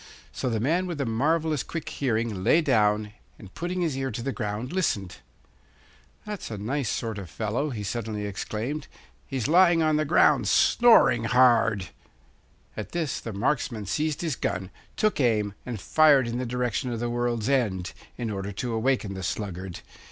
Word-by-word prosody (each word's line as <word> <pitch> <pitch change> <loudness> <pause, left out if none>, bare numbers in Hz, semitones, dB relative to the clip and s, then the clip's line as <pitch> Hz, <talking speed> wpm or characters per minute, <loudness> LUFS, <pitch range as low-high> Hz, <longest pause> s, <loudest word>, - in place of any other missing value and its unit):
So 130 - -2
the 115 -2 -1
man 165 +10 +1
with 170 -3 -4
the 140 - -1
marvellous 150 +6 +1
quick 165 -3 -6
hearing 115 -7 -1
lay 160 - +5
down 105 -6 +2 0.2
and, 100 -2 -13
putting 180 +1 -3
his 160 -6 0
ear 135 0 -2
to 115 0 -5
the 135 - -1
ground, 110 +4 -4
listened. 100 - -1 1.1
'That's 210 -2 -6
a 110 - -5
nice 120 +5 -2
sort 110 -3 -3
of 95 -4 -8
fellow!' 115 - -2
he 110 -6 -5
suddenly 105 0 -3
exclaimed. 110 +8 -4 0.4
'He's 130 -5 -2
lying 175 0 +5
on 155 -1 +2
the 155 - +2
ground, 155 - +4
snoring 180 - +5
hard!' 115 -5 +3 0.9
At - - -6
this 165 -5 -1
the 115 - -6
marksman 115 0 -1
seized 150 +9 -1
his 160 -5 -1
gun, 95 -3 -3 0.3
took 215 -5 +1
aim, 105 -6 +2
and 120 -4 -4
fired 145 0 +4
in 120 +1 -3
the 125 - -3
direction 125 +1 -1
of 115 - -3
the 120 - -1
world's 120 -2 -1
end, 105 -10 0 0.2
in 115 -3 -3
order 100 0 -4
to 115 +4 -3
awaken 115 -3 0
the 95 - -6
sluggard. 95 -1 -4
120 Hz, 175 wpm, -26 LUFS, 105-145 Hz, 1.1 s, lay